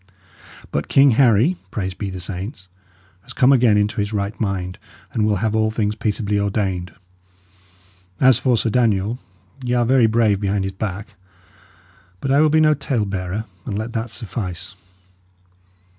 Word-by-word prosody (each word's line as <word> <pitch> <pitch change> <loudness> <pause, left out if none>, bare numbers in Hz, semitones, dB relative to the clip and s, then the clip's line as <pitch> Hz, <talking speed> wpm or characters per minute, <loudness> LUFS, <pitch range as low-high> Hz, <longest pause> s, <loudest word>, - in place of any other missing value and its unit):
But 70 - -2
King 140 0 +5
Harry 125 - +4
praised 95 -5 -4
be 100 - -3
the 95 -1 -6
saints! 95 +2 -6 0.5
has 125 +5 -9
come 130 +2 +4
again 120 -5 +4
into 105 0 0
his 100 +1 -3
right 100 -1 -2
mind, 90 -3 -2 0.3
and 110 -1 +1
will 105 - +2
have 110 +2 -1
all 110 0 +2
things 105 -1 -1
peaceably 105 -1 -1
ordained. 95 -4 -2 1.2
And 130 - +4
as 130 -2 +6
for 125 -2 +2
Sir 115 0 0
Daniel, 115 -1 +1 0.4
y' 125 0 -1
are 120 -1 +2
very 125 -1 +4
brave 110 -3 +2
behind 100 -1 0
his 95 0 -3
back. 100 +2 -5 1.1
But 135 - -2
I 140 +2 +5
will 155 - +4
be 155 +1 +3
no 155 -1 +5
tale 135 -6 -1
bearer; 95 +2 -4 0.2
and 100 - -4
let 110 +2 -4
that 115 0 -3
suffice." 95 -6 -6
110 Hz, 165 wpm, -20 LUFS, 100-120 Hz, 1.2 s, as